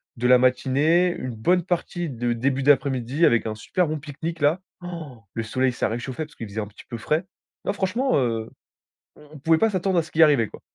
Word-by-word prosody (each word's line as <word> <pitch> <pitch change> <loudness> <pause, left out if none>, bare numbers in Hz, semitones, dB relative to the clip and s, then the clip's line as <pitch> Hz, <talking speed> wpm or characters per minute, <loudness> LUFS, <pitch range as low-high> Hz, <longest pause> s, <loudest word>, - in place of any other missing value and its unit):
de 125 +1 0
la 125 0 +7
matinée, 135 +8 +3
une 125 -2 -5
bonne 175 +11 +2
partie 175 -1 -2
de 120 -2 -2
début 130 +3 0
d'après-midi 135 +1 +2
avec 120 -5 +3
un 110 -1 -3
super 175 - -1
bon 155 0 -2
pique-nique 160 +3 -6
là. 155 +5 +2 0.2
Han! 160 - -8
Le 115 - -3
soleil, 130 +3 0
ça 120 - -1
réchauffait 120 +6 -4
parce 150 - -19
qu'il 115 - -7
faisait 105 +2 -4
un 105 - -5
petit 105 - -15
peu 120 - -5
frais. 155 - -1 0.4
Non, 200 - 0
franchement, 220 +7 0
heu, 115 -4 -1 0.7
on 150 - -17
on - - -9
pouvait 160 +3 +3
pas 225 +4 +3
s'attendre 190 -1 0
à - - +3
ce 160 - -13
qui 165 - +3
arrivait 140 -8 +3
quoi. - - -12
140 Hz, 225 wpm, -24 LUFS, 120-170 Hz, 0.7 s, la